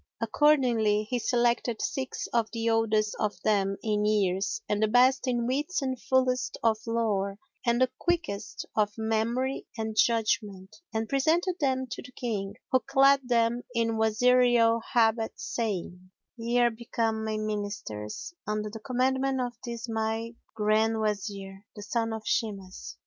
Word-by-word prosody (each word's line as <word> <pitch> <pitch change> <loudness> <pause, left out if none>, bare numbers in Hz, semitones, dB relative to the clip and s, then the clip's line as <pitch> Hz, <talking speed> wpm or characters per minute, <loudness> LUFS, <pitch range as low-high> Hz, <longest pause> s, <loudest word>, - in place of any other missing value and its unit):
Accordingly 230 -4 +3
he 245 +3 -2
selected 235 0 +1
six 265 -2 -3
of 230 -2 +2
the 230 0 0
oldest 215 -2 +1
of 210 -1 -1
them 195 -2 +1
in 210 -1 0
years 195 -2 +1
and 210 0 0
the 215 - +4
best 255 +4 +4
in 240 -2 0
wits 290 +8 -1
and 260 -2 -3
fullest 255 -1 +1
of 220 -2 +3
lore 205 -4 0 0.3
and 235 0 +3
the 255 -1 +3
quickest 320 - -2
of 210 0 +1
memory 225 +4 -1
and 220 -1 -3
judgment, 215 -4 +1 0.2
and 220 -1 -2
presented 330 - +1
them 260 -3 +1
to - - -5
the 255 - -12
King, 205 -5 -3 0.2
who 260 - +5
clad 275 +2 +4
them 235 0 +2
in 230 -1 +1
Wazirial 230 +1 +4
habit 225 -1 +3
saying, 185 -5 -4 0.3
"Ye 235 +1 -1
are 240 -1 +4
become 225 -1 -2
my 220 0 -2
Ministers, 205 - -4
under 210 0 -2
the 225 - -7
commandment 265 +2 0
of 245 -1 -2
this 235 -1 -5
my 225 +1 -2 0.2
Grand 220 +1 +2
Wazir, 200 -2 -3
the 210 - -8
son 225 +1 -1
of 220 -1 -5
Shimas. 195 -4 -3
225 Hz, 150 wpm, -28 LUFS, 215-245 Hz, 0.3 s, who